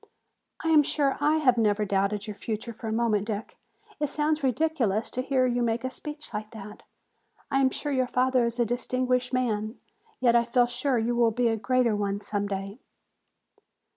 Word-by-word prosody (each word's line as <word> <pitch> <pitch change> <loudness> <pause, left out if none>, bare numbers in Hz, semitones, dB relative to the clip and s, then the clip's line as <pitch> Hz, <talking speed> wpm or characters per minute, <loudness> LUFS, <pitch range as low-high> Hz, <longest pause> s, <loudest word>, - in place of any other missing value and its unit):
"I 325 - 0
am 310 -2 +7
sure 280 -1 0
I 300 +2 +3
have 250 -6 +3
never 210 -1 +2
doubted 200 +1 0
your 210 -2 -6
future 220 +3 -4
for 225 +1 -8
a - - -2
moment, 220 -2 +1
Dick. 215 0 -4 0.4
It 295 - +1
sounds 300 +1 0
ridiculous 255 -6 0
to 255 - -1
hear 260 0 +1
you 245 -1 0
make 230 0 0
a 260 - -2
speech 300 0 -7
like 215 0 -4
that. 210 -1 -10 0.7
I 270 - +2
am 265 - +4
sure 290 +3 -4
your 260 -2 +1
father 255 -1 +2
is 235 +1 -5
a 240 - +3
distinguished 250 +2 -1
man, 225 -3 -1 0.4
yet 240 -2 +3
I 235 - +5
feel 240 +1 +3
sure 245 +2 0
you 235 +1 0
will 235 -1 +4
be 240 +1 +1
a 225 - +1
greater 235 +1 +1
one 200 -1 -1
some 205 0 -2
day." 195 +3 -5
240 Hz, 195 wpm, -27 LUFS, 215-260 Hz, 0.7 s, am